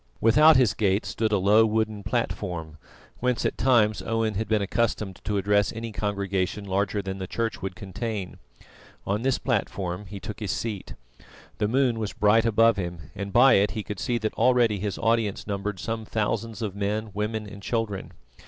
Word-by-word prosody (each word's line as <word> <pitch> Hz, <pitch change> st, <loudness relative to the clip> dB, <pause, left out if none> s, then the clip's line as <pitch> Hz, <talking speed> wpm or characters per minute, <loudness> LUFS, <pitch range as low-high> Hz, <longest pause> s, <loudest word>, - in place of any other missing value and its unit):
Without 150 Hz, +8 st, +6 dB
his 120 Hz, -5 st, +4 dB
gate 100 Hz, -2 st, +1 dB
stood 110 Hz, -1 st, -1 dB
a 105 Hz, -, +3 dB
low 105 Hz, +4 st, +5 dB
wooden 110 Hz, -1 st, 0 dB
platform, 80 Hz, -5 st, -3 dB, 0.4 s
whence 125 Hz, -1 st, 0 dB
at -, -, 0 dB
times 110 Hz, -5 st, +3 dB
Owen 115 Hz, -1 st, -1 dB
had 110 Hz, +3 st, -2 dB
been 110 Hz, -2 st, +1 dB
accustomed 105 Hz, -2 st, -1 dB
to 105 Hz, -1 st, -1 dB
address 100 Hz, +1 st, +2 dB
any 115 Hz, 0 st, -6 dB
congregation 100 Hz, -1 st, -2 dB
larger 100 Hz, +1 st, -1 dB
than 95 Hz, 0 st, -5 dB
the 95 Hz, -, -4 dB
church 115 Hz, +2 st, -2 dB
would 95 Hz, -1 st, -4 dB
contain. 105 Hz, -1 st, -5 dB, 0.7 s
On 100 Hz, +2 st, -1 dB
this 130 Hz, +1 st, +1 dB
platform 100 Hz, -5 st, -2 dB
he 100 Hz, +1 st, -7 dB
took 105 Hz, +1 st, -7 dB
his 105 Hz, -3 st, -4 dB
seat. 105 Hz, 0 st, -4 dB, 0.6 s
The 105 Hz, -, +2 dB
moon 125 Hz, 0 st, +2 dB
was 105 Hz, -2 st, -3 dB
bright 110 Hz, +2 st, +3 dB
above 115 Hz, 0 st, +4 dB
him, 85 Hz, -6 st, -5 dB
and 100 Hz, +1 st, -5 dB
by 125 Hz, +6 st, +6 dB
it 100 Hz, +1 st, +3 dB
he 105 Hz, -, -2 dB
could 105 Hz, -2 st, -6 dB
see 120 Hz, -, 0 dB
that 110 Hz, -1 st, -2 dB
already 120 Hz, -5 st, +3 dB
his 100 Hz, 0 st, -3 dB
audience 115 Hz, -3 st, 0 dB
numbered 100 Hz, -1 st, -3 dB
some 115 Hz, -1 st, -3 dB
thousands 110 Hz, +1 st, -2 dB
of 100 Hz, -3 st, -3 dB
men, 105 Hz, +2 st, -2 dB
women 105 Hz, +1 st, -2 dB
and 100 Hz, -1 st, -10 dB
children. 110 Hz, -3 st, -2 dB
105 Hz, 180 wpm, -26 LUFS, 100-115 Hz, 0.7 s, Without